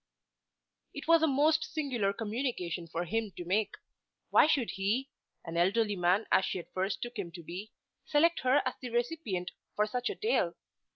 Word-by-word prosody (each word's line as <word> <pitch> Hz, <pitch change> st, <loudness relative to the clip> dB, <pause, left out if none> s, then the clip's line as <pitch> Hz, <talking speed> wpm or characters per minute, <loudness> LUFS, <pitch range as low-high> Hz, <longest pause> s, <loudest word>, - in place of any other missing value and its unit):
It 285 Hz, -, -7 dB
was 330 Hz, 0 st, +6 dB
a 320 Hz, -, +4 dB
most 305 Hz, +3 st, +3 dB
singular 255 Hz, -10 st, -1 dB
communication 205 Hz, -6 st, -3 dB
for 165 Hz, +1 st, -3 dB
him 220 Hz, +3 st, -1 dB
to 175 Hz, -, -5 dB
make. 205 Hz, +4 st, 0 dB, 0.6 s
Why -, -, +7 dB
should 275 Hz, -7 st, +2 dB
he, 220 Hz, +8 st, -1 dB, 0.3 s
an 165 Hz, +1 st, -4 dB
elderly 205 Hz, +4 st, +2 dB
man 180 Hz, +4 st, +2 dB
as -, -, +5 dB
she -, -, -2 dB
at 175 Hz, -, -9 dB
first 190 Hz, +2 st, -1 dB
took 240 Hz, -2 st, -6 dB
him 175 Hz, -4 st, -4 dB
to 170 Hz, -, -9 dB
be, 185 Hz, +6 st, -7 dB, 0.4 s
select 330 Hz, +3 st, +3 dB
her 260 Hz, +3 st, +3 dB
as -, -, 0 dB
the 250 Hz, -, -5 dB
recipient 240 Hz, -, -2 dB, 0.2 s
for 210 Hz, -, +3 dB
such 245 Hz, +3 st, -2 dB
a -, -, -3 dB
tale? 440 Hz, +2 st, +1 dB
220 Hz, 180 wpm, -31 LUFS, 185-275 Hz, 0.6 s, Why